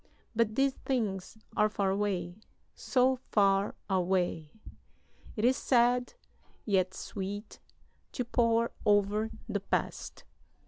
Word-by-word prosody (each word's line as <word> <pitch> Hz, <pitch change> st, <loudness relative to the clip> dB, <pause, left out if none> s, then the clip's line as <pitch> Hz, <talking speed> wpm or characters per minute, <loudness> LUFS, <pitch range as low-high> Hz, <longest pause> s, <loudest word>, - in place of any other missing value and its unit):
But 220 Hz, -1 st, +1 dB
these 270 Hz, +1 st, +3 dB
things 220 Hz, -7 st, -3 dB, 0.2 s
are 215 Hz, -, +3 dB
far 200 Hz, -2 st, 0 dB
away, 190 Hz, -2 st, -2 dB, 0.3 s
so 260 Hz, 0 st, +2 dB
far 195 Hz, -1 st, +3 dB
away! 180 Hz, -4 st, 0 dB, 0.8 s
It 215 Hz, -, 0 dB
is 255 Hz, +2 st, +5 dB
sad, 245 Hz, -, +2 dB, 0.5 s
yet 190 Hz, -3 st, +1 dB
sweet, 205 Hz, +2 st, -6 dB, 0.5 s
to 250 Hz, -, -2 dB
pore 230 Hz, -1 st, +2 dB
over 205 Hz, +1 st, +2 dB, 0.2 s
the -, -, -1 dB
past. -, -, -3 dB
210 Hz, 105 wpm, -30 LUFS, 190-235 Hz, 0.8 s, is